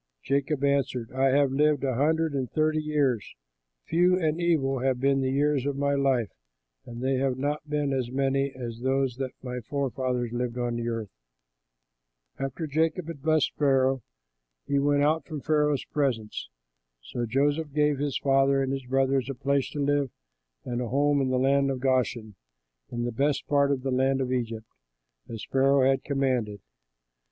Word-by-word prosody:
Jacob 140 +3 0
answered, 135 -4 0
"I 130 +1 +1
have 140 0 +3
lived 150 +1 +2
a 135 -1 +1
hundred 160 +4 +1
and 130 -3 -2
thirty 155 0 +1
years; 145 -8 0 0.5
few 180 +2 +3
and 160 0 0
evil 140 -6 +1
have 130 0 0
been 135 +1 +2
the 130 - 0
years 140 0 +1
of 140 -1 -2
my 140 0 +1
life, 135 -6 +1 0.6
and 120 +1 -7
they 135 0 +1
have 130 -1 0
not 145 +2 -3
been 145 -2 0
as 130 -3 -1
many 135 +1 0
as 120 -3 -6
those 130 -1 0
that 135 -1 -2
my 125 -1 -4
forefathers 130 -2 -2
lived 120 0 -2
on 120 -1 -1
earth." 115 -3 -3 1.3
After 135 +4 -3
Jacob 160 +3 0
had 150 -5 -7
blessed 155 0 +2
Pharaoh, 135 -2 +3 0.6
he 140 0 +1
went 145 0 +2
out 155 +2 +2
from 155 -2 -5
Pharaoh's 150 -2 +1
presence. 120 - -2 0.5
So 120 - -4
Joseph 145 +5 0
gave 150 -1 +1
his 145 -2 -1
father 135 0 +3
and 135 - -2
his 135 -2 -5
brothers 135 0 +1
a 135 - -3
place 140 +1 0
to 145 - -6
live 145 -1 +1 0.6
in - - -5
and 120 0 -1
a 120 - -2
home 145 +3 +2
in 130 - 0
the 130 - +1
land 140 +1 +3
of 135 -1 -2
Goshen, 125 -4 0 0.6
in 120 0 -3
the 120 - -2
best 140 +4 0
part 140 -1 +2
of 130 -2 -1
the 135 - -1
land 135 +1 +2
of 130 -1 -1
Egypt, 115 -3 -3 0.6
as 115 -2 -6
Pharaoh 135 0 +4
had 135 0 +1
commanded. 130 -7 -1
135 Hz, 175 wpm, -27 LUFS, 125-145 Hz, 1.3 s, Pharaoh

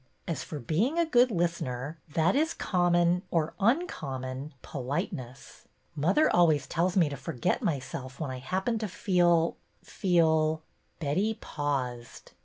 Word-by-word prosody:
As 165 - -2
for 155 - -6
being 180 - 0
a 340 - +3
good 250 -5 +4
listener, 165 - -2 0.2
that 165 +5 +3
is 315 +3 +1
common 175 -1 +2
— - - -41
or 160 -2 0
uncommon 145 - -1
— - - -39
po 135 -4 -6
liteness. 130 -1 -5 0.3
Mother 185 - +3
always 155 -6 +4
tells 175 +6 0
me 170 -4 +5
to 145 - -4
forget 135 -2 -2
my 155 - +1
self 130 0 -8
when 150 -5 -3
I 130 - -5
happen 190 - -1
to 215 - -2
feel 175 -3 +2
— - - -40
feel 160 -4 +2
— - - -42
" - - -42
Betty 190 +9 0
paused. 130 - -4
165 Hz, 165 wpm, -29 LUFS, 140-185 Hz, 0.3 s, me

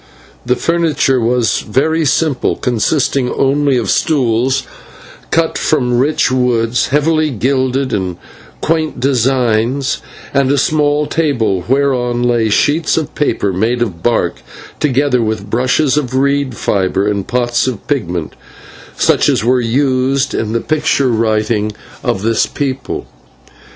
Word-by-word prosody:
The 125 - +3
furniture 160 -6 +1
was 120 -1 +1
very 155 +8 0
simple, 140 -1 +1
consisting 125 +1 0
only 140 0 +1
of 110 -5 0
stools 130 -2 +1 0.7
cut 160 0 0
from 125 -5 +1
rich 145 0 +1
woods 125 -2 +1
heavily 155 +2 +1
gilded 130 +2 0
in 90 -3 -2 0.4
quaint 160 -1 -1
designs, 130 0 +1 0.3
and 140 -1 +2
a 145 - +2
small 150 +1 +1
table 115 - 0
whereon 125 -2 +1
lay 120 -2 +1
sheets 155 +10 +1
of 155 -1 -2
paper 105 -9 0
made 115 +6 0
of 90 -8 -6
bark, 120 - 0 0.4
together 140 -3 +1
with 110 -2 -3
brushes 130 +4 +1
of 130 -4 -2
reed 140 -2 0
fibre 95 0 0
and 100 -2 -2
pots 120 0 0
of 120 -6 -4
pigment, 90 - -2 0.6
such - - +3
as - - +1
were 125 +2 +2
used 130 +2 +1
in 110 -1 -2
the 115 - 0
picture 150 -3 +1
writing 110 -2 0 0.3
of 95 - -1
this 115 0 +1
people. 135 -1 -4
130 Hz, 130 wpm, -15 LUFS, 115-140 Hz, 0.7 s, The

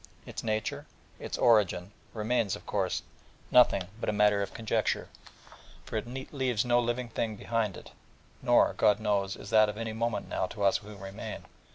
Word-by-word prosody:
Its - - -6
nature, 110 -1 -2 0.3
its - - -4
origin, 105 -5 +3 0.2
remains, 110 -2 0
of - - -12
course, - - -1 0.5
nothing 120 -6 +6 0.2
but 105 - 0
matter 105 -1 +4
of 100 - -3
conjecture: 115 -1 -1 0.8
for - - -7
it 110 +1 -2 0.3
leaves 130 -5 0
no 120 0 +4
living 120 +1 -1
thing 110 -1 -2
behind 110 -2 -1
it: - - -12 0.5
nor, - - +4
God 105 0 +3
knows, 100 -3 0
is 100 - -10
that 110 -1 +6
of 105 - -5
any 110 -1 -3
moment 115 0 -2
now 95 - -1
to 105 - -5
us 100 - +4
who 105 0 -11
remain. 95 +1 -7
110 Hz, 170 wpm, -30 LUFS, 100-115 Hz, 0.8 s, nothing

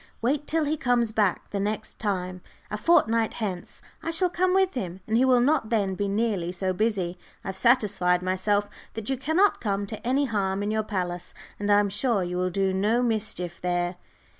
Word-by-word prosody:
Wait 280 +5 0
till 320 -1 +1
he 300 +2 0
comes 245 -4 +1
back 210 -4 0
the 200 - -2
next 210 +2 -3
time, 185 -3 -2 0.3
a - - -1
fortnight 230 -4 +3
hence. 190 -6 -5 0.2
I - - -4
shall 350 +2 +2
come 365 +1 +2
with 380 -1 +3
him, 185 -7 -4
and 220 - -1
he 240 - +4
will 255 -1 +5
not 260 -2 +2
then 200 -4 +1
be 200 +2 -2
nearly 200 -4 0
so 185 +1 -1
busy. 185 -4 -1 0.2
I - - -5
have 190 - -4
satisfied 195 -6 +2
myself 200 +3 +1 0.3
that 225 +3 -3
you - - +2
cannot 320 +10 +2
come 200 -2 -1
to 215 +3 -7
any 275 +3 +2
harm 200 -4 -1
in 205 - -1
your 220 0 +1
palace, 180 -4 -4 0.2
and 205 0 0
I 205 - +6
am 205 -1 +1
sure 205 0 +1
you 180 0 -3
will 185 0 +1
do 190 +1 0
no 215 +6 +2
mischief 210 -7 -2
there." 175 0 -1
210 Hz, 205 wpm, -26 LUFS, 190-240 Hz, 0.3 s, I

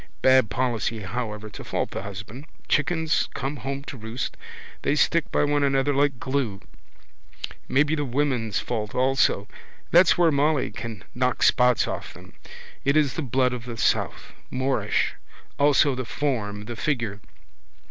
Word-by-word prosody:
Bad 130 -4 +5
policy 115 -1 -1
however 105 +1 -4
to - - -9
fault - - -2
the - - -4
husband. 105 +7 -8 0.2
Chickens 160 +1 +1
come 140 +2 -3
home 135 +3 -4
to 140 - -8
roost. 110 +2 -4 0.5
They 145 - +1
stick 165 +1 +2
by - - +2
one 145 0 +2
another 140 0 +2
like 140 -2 +1
glue. 130 -8 -2 1.1
Maybe 150 +3 +3
the 150 -2 0
women's 125 -5 0
fault 110 -3 -3
also. 130 -5 +2 0.4
That's 175 +1 +6
where 170 -2 +5
Molly 145 0 +2
can 110 -6 -7
knock 125 0 0
spots 125 -2 +4
off - - -5
them. - - -14 0.5
It's 140 -1 +3
the - - -3
blood 130 -1 +1
of 120 -2 -6
the 120 -2 -6
south. - - 0 0.2
Moorish. 130 -5 0 0.5
Also 145 0 +5
the 130 0 -3
form, 105 -4 -2
the 120 +1 -6
figure. 115 -6 -1
130 Hz, 145 wpm, -25 LUFS, 115-145 Hz, 1.1 s, That's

